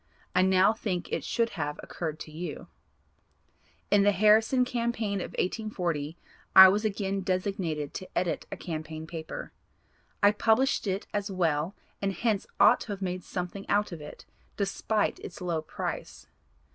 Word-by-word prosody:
I 180 - +4
now 190 +2 +5
think 195 -5 -3
it - - -1
should 230 -1 0
have 150 -3 -3
occurred 155 -3 -5
to 155 - -8
you. 160 -1 -6 1.2
In 205 -1 +6
the 205 +1 +5
Harrison 220 +5 +4
campaign 235 -5 -1
of - - -6
1840 175 -7 -2 0.4
I 190 0 +12
was 205 +3 +1
again 195 -2 -1
designated 185 -6 -2
to 185 - -7
edit 175 -2 -1
a - - -4
campaign 160 -1 -5
paper. 160 -1 -7 0.7
I 205 - +8
published 225 +3 +2
it 190 +1 -1
as 205 0 -1
well 170 -2 0 0.3
and 195 -1 0
hence 210 +1 0
ought - - +7
to 205 - -4
have 195 -1 -6
made 180 -1 -3
something 180 +2 -5
out 205 0 +2
of 165 -3 -7
it 150 - -10 0.3
despite 205 +1 0
its 175 - -9
low 170 -3 -1
price. 155 - -5
190 Hz, 155 wpm, -28 LUFS, 170-210 Hz, 1.2 s, I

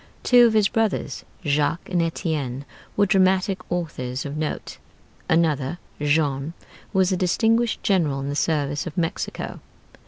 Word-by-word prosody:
Two 245 -1 +7
of 225 - 0
his 215 -2 +4
brothers, 220 -2 -1 0.2
Jacques 145 +3 +1
and 180 -2 +1
Étienne, 150 -6 -2 0.3
were 205 - +5
dramatic 190 0 +3
authors 135 -7 -3
of 140 +1 -5
note. 155 0 -4 0.5
Another, 160 -2 +2 0.2
Jean, 145 0 +1 0.4
was 190 -1 +2
a - - +2
distinguished 225 +6 +1
general 160 -9 +2
in 135 - -4
the 145 - -2
service 145 -1 0
of 170 - -8
Mexico. 165 -2 -3
165 Hz, 135 wpm, -23 LUFS, 145-190 Hz, 0.5 s, Two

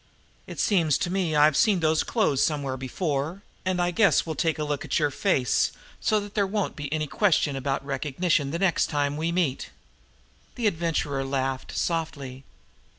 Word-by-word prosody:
"It - - -8
seems 165 -8 +3
to 175 - -2
me 180 -5 0
I've 150 0 +5
seen 205 +1 +3
those 155 -1 +2
clothes 195 - +1
somewhere 140 -4 0
before, 145 +6 -3 0.2
and 185 -1 -1
I 175 0 +1
guess 195 -2 +4
now - - -10
we'll 160 - -2
take 160 +2 0
a 155 - -2
look 145 -1 -2
at - - -1
your 145 -2 +1
face 140 - +1 0.3
so 215 - +2
that 205 0 -9
there 200 -2 +1
won't 205 0 -2
be 145 -2 -6
any 155 0 0
question 155 -3 +1
about 135 +1 -2
recognition 145 +2 0
the 165 - -2
next 180 -1 +2
time 145 -1 -1
we 160 +2 -1
meet." 170 -7 -1 0.9
The 240 - -3
Adventurer 165 -7 0
laughed 135 -1 -3
softly. 140 -6 -3
155 Hz, 180 wpm, -26 LUFS, 140-180 Hz, 0.9 s, I've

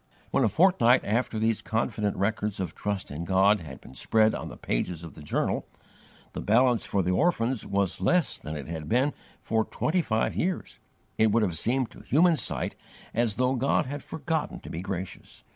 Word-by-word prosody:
When, - - +3
a 110 - +4
fortnight 130 - +4
after 115 +1 0
these 110 0 +1
confident 105 -2 -1
records 105 +1 -1
of 95 - -3
trust 100 -5 -3
in 75 +3 -4
God 95 +3 +4
had 75 -6 -9
been - - -14
spread 110 +8 +3
on - - -4
the - - -9
pages 80 +7 -2
of 85 - -9
the - - -12
journal, 75 - -1 0.7
the - - -4
balance 120 +3 +3
for 100 -1 +1
the 90 - +1
orphans 125 - +1
was 100 -2 0
less 180 -3 +2
than 75 +1 -6
it 70 - -7
had 80 -2 -5
been 130 +5 +2 0.3
for 110 0 0
twenty 175 +10 0
five 110 -7 0
years, 185 +1 -2 0.4
it 110 -1 +5
would 115 +1 +3
have 90 -5 0
seemed 125 +3 +1
to - - -13
human 170 +4 +4
sight - - -2 0.4
as 115 -2 +1
though 125 +1 +2
God 135 +1 +1
had 140 +2 -5
forgotten 160 -1 -3
to - - -9
be 85 - -4
gracious. 95 -1 -6
110 Hz, 195 wpm, -27 LUFS, 95-130 Hz, 0.7 s, it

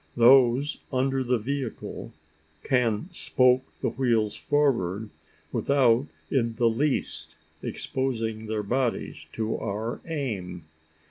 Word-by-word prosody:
Those 125 +3 +5
under 135 0 +1
the 125 0 +2
vehicle 130 +1 -4 0.5
can 125 - +1
"spoke" 125 -6 +3 0.2
the - - +1
wheels 115 -5 +1
forward, 110 -8 0 0.4
without 135 -1 +3 0.2
in 115 -4 +1
the 120 -1 +3
least 110 - -1 0.2
exposing 115 -4 -3
their 110 -1 -2
bodies 120 +3 -2
to 110 0 -2
our 110 +4 -3
aim. 100 - -4
120 Hz, 105 wpm, -26 LUFS, 110-135 Hz, 0.5 s, Those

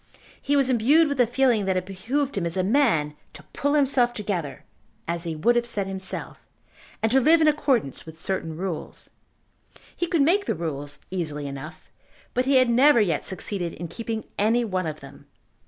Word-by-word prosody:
He 285 - 0
was 275 -2 +3
imbued 265 +7 +4
with 285 -3 0
a 240 - +4
feeling 240 -4 +2
that 190 -1 +1
it 185 - -2
behoved 255 +10 -2
him 180 -4 -1
as 170 - -5
a 185 - +1
man 190 - +2 0.2
to 150 - -12
"pull 285 +1 0
himself 260 -4 +3
together," 185 -9 -4 0.4
as 170 +1 -2
he 165 -1 -3
would 235 +11 +2
have 240 0 +1
said 205 -4 -1
himself, 190 0 -1 0.6
and 225 - +2
to 265 - +5
live 320 +6 +5
in 315 - +4
accordance 270 - +1
with 160 0 -12
certain 165 -2 -4
rules. 180 -2 -5 0.8
He 345 - -2
could 330 -4 +2
make 390 +7 +2
the - - -1
rules 145 -3 -5
easily 155 -6 -3
enough, 140 -1 -8 0.5
but 250 +1 +1
he 275 +1 +2
had 255 -1 +5
never 250 +3 +5
yet 175 -8 0
succeeded 185 -2 -3
in 170 0 -7
keeping 225 +1 -4 0.2
any 230 +4 +2
one 185 -5 -2
of 155 -1 -6
them. 140 0 -14
210 Hz, 190 wpm, -24 LUFS, 170-265 Hz, 0.8 s, to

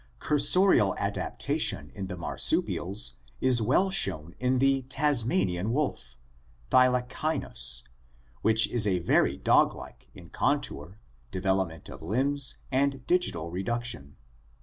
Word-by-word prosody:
Cursorial 180 +6 +3
adaptation 70 0 -1
in 95 -2 -6
the 90 -1 -6
marsupials - - -1 0.2
is 125 -3 +3
well 160 - +2
shown 80 - -1
in 125 +1 +1
the 135 +1 +2
Tasmanian 115 -10 0
wotf, 120 - -2 0.6
Thylacynus, 125 - +1 0.6
which 110 0 +5
is 115 -3 +2
very 85 -7 +2
dog - - +3
like - - -12
in - - -14
contour, 80 +8 -2 0.3
development 95 -4 -2
of - - -11
limbs, 130 - 0
and 135 -1 0
digital 175 - 0
reduction. 115 - -4
115 Hz, 105 wpm, -27 LUFS, 90-135 Hz, 0.6 s, which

